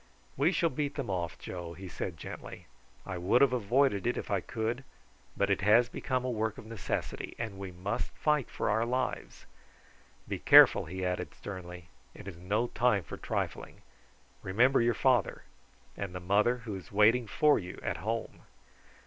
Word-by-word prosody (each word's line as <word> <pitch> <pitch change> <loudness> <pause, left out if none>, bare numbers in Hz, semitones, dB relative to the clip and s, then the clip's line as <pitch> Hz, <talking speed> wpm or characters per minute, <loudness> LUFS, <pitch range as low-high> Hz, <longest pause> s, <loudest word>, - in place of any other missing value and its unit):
"We 145 +6 +3
shall 165 -2 +1
beat 145 +1 -2
them 135 -8 -3
off, 85 -2 -3
Joe," 85 -2 -7
he 95 +3 -9
said 90 -1 -5
gently. - - -9 0.4
"I 95 -2 -5
would 95 +8 +3
have 135 -2 +4
avoided 120 -1 +2
it 120 - 0
if - - -5
I 100 -2 +1
could, 115 +5 -3 0.5
but 100 0 +1
it 100 - +1
has 115 +5 +5
become 130 0 -2
a 130 - -1
work 110 -2 -2
of - - -10
necessity, 110 -3 -4
and 110 -4 -5
we 100 -1 -5
must 95 +5 -3
fight 150 -4 +1
for - - -3
our 110 +2 +2
lives. 125 +2 -3 0.8
Be - - -3
careful," - - +7
he 95 0 -4
added 90 0 -3
sternly. 90 -3 -8 0.3
"It - - -11
is 95 -4 -7
no 105 +6 0
time 115 -6 +2
for - - -8
trifling. - - -4 0.6
Remember 120 +9 +3
your 120 0 +2
father, 125 -5 +2 0.5
and 95 -3 -5
the - - -3
mother 105 +7 +2
who 110 - -4
is 95 - -10
waiting 110 +4 +4
for 150 +7 +3
you 90 -2 -8
at - - -2
home. 115 +3 -4
105 Hz, 175 wpm, -30 LUFS, 95-125 Hz, 0.8 s, careful